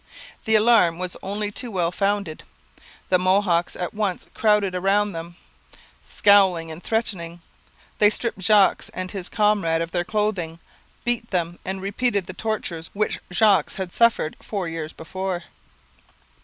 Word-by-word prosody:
The 220 - +3
alarm 215 -6 +4
was 180 0 -4
only 205 +2 -3
too 245 +3 -3
well 175 -5 0
founded. 200 -4 -1 0.7
The 185 - +4
Mohawks 185 -2 +2
at 180 - -4
once 205 -4 -2
crowded 210 -3 +2
round 195 +2 +1
them, 165 +1 -7 0.7
scowling 190 -5 +3
and 160 +2 -8
threatening. 180 -7 -2 0.6
They 210 - +7
stripped 225 0 -1
Jogues 200 +1 +3
and 185 0 -4
his 190 -3 -4
comrade 205 -7 +2
of 165 0 -3
their 175 -1 0
clothing, 190 -5 -2 0.5
beat 240 -1 0
them, 175 -2 -2
and 190 0 -4
repeated 205 -1 0
the 185 - -8
tortures 195 -6 -3
which 210 +1 -1
Jogues 200 +2 +3
had 185 -2 -5
suffered 235 -9 +2
four 195 -5 -4
years 165 -1 -5
before. 185 +2 -5
190 Hz, 140 wpm, -23 LUFS, 175-210 Hz, 0.7 s, They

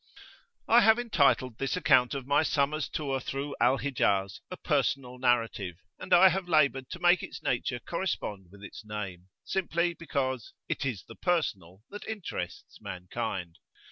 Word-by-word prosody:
I 235 +2 +7
have 220 0 +6
entitled 140 - +2
this 135 -1 -1
account 125 +1 +4
of 135 -2 -4
my 145 +2 +3
summer's 155 -1 0
tour 135 -3 -2
through 140 +2 -4
Al 135 - +4
Hijaz, 100 -9 0
a 185 - -6
Personal 135 -4 -1
Narrative, 115 -7 +1 0.2
and - - -9
I 185 +2 +8
have 185 -1 -2
laboured 140 -5 +3
to 185 - -7
make 175 0 +4
its - - -8
nature 120 0 -1
correspond 120 - -4
with 100 +2 -15
its 100 - -9
name, 100 -4 -6 0.2
simply 175 -2 0
because 130 -7 -3
"it 140 - -2
is 110 -9 -4
the - - -10
personal 100 - -2
that 205 - -8
interests 220 -4 -6
mankind." 90 -1 -5
135 Hz, 155 wpm, -29 LUFS, 110-170 Hz, 0.2 s, I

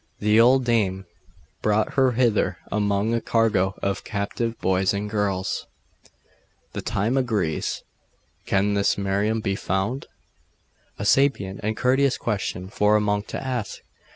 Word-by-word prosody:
'The 105 +2 +4
old 130 +2 +5
dame 95 -5 +1 0.6
brought 105 0 +1
her 130 -2 +3
hither 115 -3 +1
among 105 +1 +1
a 115 - 0
cargo 105 -5 +1
of 100 0 -1
captive 115 +3 -3
boys 95 +1 +1
and 105 +1 -3
girls.' 100 -3 -1 1.1
'The - - -4
time 115 +7 0
agrees.... 105 - -1 0.6
Can 100 +1 +2
this 100 -1 +2
Miriam 100 +3 0
be 100 -2 -1
found?' 95 +9 -2 0.9
'A - - -4
sapient 105 -7 +2
and 110 +1 -2
courteous 135 +1 +2
question 100 -4 -3
for 105 +1 +2
a - - +5
monk 105 0 -1
to - - -4
ask! 125 -6 -4
105 Hz, 135 wpm, -24 LUFS, 100-115 Hz, 1.1 s, old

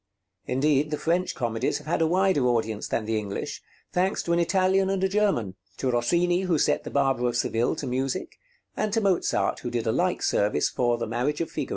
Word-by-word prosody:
Indeed, 145 +2 +2
the 150 - -2
French 175 +4 0
comedies 115 +2 -1
have 150 - -12
had 165 +1 0
a 160 - +4
wider 185 -6 +2
audience 110 -3 -1
than 110 - -2
the 110 0 0
English, 100 -2 -5 0.3
thanks 185 +2 +1
to 170 - 0
an 170 - +2
Italian 190 +2 +2
and 195 -1 0
a - - +4
German, 190 - +1 0.2
to 130 - 0
Rossini 175 +9 +2
who 180 -4 +1
set - - +1
'The - - -6
Barber 135 -3 +1
of 120 0 -1
Seville' 115 0 0
to - - -5
music, 130 +6 -3 0.4
and 215 - -1
to 225 - +3
Mozart 195 -4 +1
who 120 - -4
did 120 -1 -2
a 110 - +2
like 180 +7 0
service 100 -7 +1
for 120 -1 +1
'The 115 - -3
Marriage 125 +6 -1
of 165 - -3
Figaro.' - - -4
145 Hz, 215 wpm, -26 LUFS, 120-180 Hz, 0.4 s, a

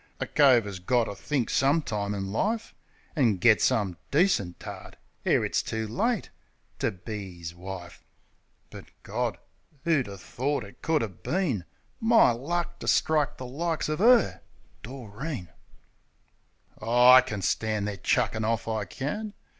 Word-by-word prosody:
A - - -1
cove 130 -6 +5
'as 100 -2 -6
got 120 +7 +2
to 105 - -5
think 130 +3 -2
some 145 +4 +3
time 105 -3 -2
in 95 -1 -4
life 220 - -1 0.4
An' 120 - +3
get 110 +4 +5
some 95 -6 +1
decent 140 - +2
tart, - - -9 0.3
ere - - +3
it's - - 0
too 110 0 -3
late, 215 - -1 0.5
To - - +1
be 95 -2 -7
'is 85 -1 -6
wife. 90 -1 -9 0.7
But, - - -10 0.2
Gawd! - - -2 0.5
'Oo 165 -2 +4
would 130 - -1
'a' 100 -1 -8
thort 130 +7 -2
it 100 - -14
could 160 -4 +1
'a' - - -1
been 125 - -2 0.3
My 225 - +5
luck 170 +8 -3
to - - -7
strike 150 -2 +2
the 130 - -7
likes 160 +5 -2
of 155 +4 -2
'er?... 240 +1 +5 0.4
Doreen! 120 - -7 1.3
Aw, 125 +2 +6
I - - +8
can 105 -6 -5
stand 110 0 0
their 100 -1 -4
chuckin' 110 +4 +1
off, 115 +1 -1
I 110 -2 -1
can. 200 - -5
120 Hz, 155 wpm, -27 LUFS, 100-155 Hz, 1.3 s, I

